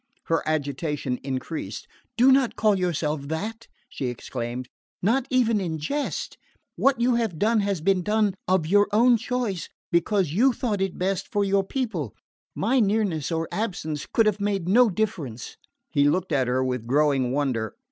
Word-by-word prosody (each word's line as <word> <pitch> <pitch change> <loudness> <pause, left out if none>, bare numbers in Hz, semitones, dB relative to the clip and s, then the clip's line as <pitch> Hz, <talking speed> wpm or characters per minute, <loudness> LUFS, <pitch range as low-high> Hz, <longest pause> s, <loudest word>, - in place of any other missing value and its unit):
Her 165 - 0
agitation 145 -3 -2
increased. 130 - -5 0.3
"Do 255 +3 +6
not 265 -2 +3
call 215 -1 +3
yourself 155 -6 -1
that!" 215 +9 -4 0.2
she 130 - -4
exclaimed. 125 0 -5 0.4
"Not 245 +6 +2
even 230 -5 +2
in 165 -4 -2
jest. 280 - -3 0.4
What 275 -3 +2
you 245 +1 +3
have 220 -8 -1
done 220 +5 +2
has 200 -4 -1
been 190 +2 +2
done 210 +1 +1
of 185 -3 +2
your 205 +5 +4
own 235 +4 +5
choice 225 -5 -3 0.2
because 175 0 +2
you 250 +8 +4
thought 220 -6 -2
it 195 -1 -1
best 190 +1 -1
for 205 -2 +1
your 195 0 +2
people. 195 - -3 0.4
My 250 +6 +2
nearness 200 - +1
or 165 0 -1
absence 160 -9 -3
could 225 - +3
have 210 -1 +1
made 200 -4 -1
no 235 +5 +5
difference." 170 - -3 0.4
He 145 0 +4
looked 185 +3 -1
at 135 -4 +2
her 130 +1 +1
with 125 -3 -3
growing 135 -2 +2
wonder. 130 -6 -1
185 Hz, 165 wpm, -25 LUFS, 145-220 Hz, 0.4 s, Do